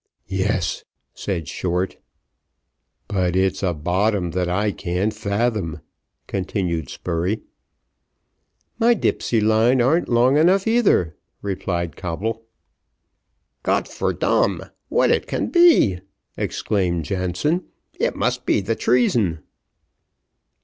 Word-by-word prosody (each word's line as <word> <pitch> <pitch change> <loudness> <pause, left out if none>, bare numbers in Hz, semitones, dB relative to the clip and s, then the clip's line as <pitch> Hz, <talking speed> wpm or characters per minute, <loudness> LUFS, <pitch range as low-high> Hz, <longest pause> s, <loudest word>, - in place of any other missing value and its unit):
"Yes," 95 -4 -1 0.3
said 85 -6 -4
Short. 90 +3 -2 1.1
"But 90 -3 0
it's 95 0 +1
a 95 -3 +1
bottom 90 +3 0
that 90 0 -1
I 100 +4 +1
can't 90 +4 -2
fathom," 105 -6 -1 0.4
continued 90 - -2
Spurey. 90 +5 -2 1.4
"My 235 +1 +5
dipsey 120 - 0
line 110 +4 +3
arn't 145 +8 +2
long 125 +4 +4
enough 185 +5 +4
either," 225 - +2 0.3
replied 85 -4 -2
Coble. 110 +6 -4 1.1
"Gott - - 0
for - - -2
dam, - - +1 0.3
what - - +3
it - - +1
can - - -2
be!" 340 - +5 0.4
exclaimed 90 -6 -1
Jansen. 95 - -1 0.3
"It - - 0
must - - -1
be - - +3
the 105 +3 -1
treason." 110 -11 +1
100 Hz, 105 wpm, -22 LUFS, 90-120 Hz, 1.4 s, My